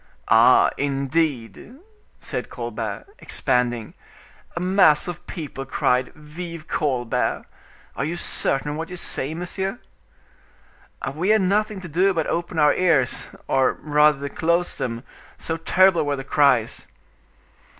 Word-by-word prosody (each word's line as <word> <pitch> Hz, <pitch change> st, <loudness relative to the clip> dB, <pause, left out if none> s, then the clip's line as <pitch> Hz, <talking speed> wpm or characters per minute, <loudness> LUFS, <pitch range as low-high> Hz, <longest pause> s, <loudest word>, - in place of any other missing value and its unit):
"Ah! -, -, +6 dB
indeed," 140 Hz, -, -2 dB, 0.4 s
said -, -, -5 dB
Colbert, -, -, -5 dB
expanding. 120 Hz, -3 st, 0 dB, 0.6 s
"A -, -, -2 dB
mass 180 Hz, -4 st, +4 dB
of 175 Hz, 0 st, -7 dB
people 145 Hz, -5 st, -6 dB
cried 125 Hz, -1 st, 0 dB
'Vive 160 Hz, +1 st, -8 dB
Colbert!' 130 Hz, -6 st, -1 dB, 0.5 s
Are 140 Hz, -, -2 dB
you 165 Hz, +4 st, -3 dB
certain 145 Hz, -3 st, 0 dB
of 150 Hz, -, -4 dB
what 165 Hz, +1 st, -5 dB
you 180 Hz, -, -6 dB
say, 155 Hz, -3 st, -3 dB
monsieur?" 190 Hz, +5 st, -4 dB, 1.4 s
"We 175 Hz, +7 st, -1 dB
had 215 Hz, -1 st, +5 dB
nothing 205 Hz, +1 st, 0 dB
to 175 Hz, -, -7 dB
do 185 Hz, +5 st, +2 dB
but 160 Hz, -, 0 dB
open 170 Hz, 0 st, -3 dB
our 150 Hz, -1 st, +5 dB
ears, 155 Hz, -8 st, +1 dB, 0.2 s
or 135 Hz, -1 st, +2 dB
rather 150 Hz, -1 st, +2 dB
to -, -, -12 dB
close 170 Hz, +2 st, +1 dB
them, 115 Hz, 0 st, -4 dB, 0.3 s
so 160 Hz, -, -2 dB
terrible 185 Hz, +1 st, +4 dB
were 145 Hz, -1 st, -1 dB
the 135 Hz, -, -6 dB
cries." 135 Hz, -5 st, +2 dB
155 Hz, 130 wpm, -23 LUFS, 135-175 Hz, 1.4 s, Ah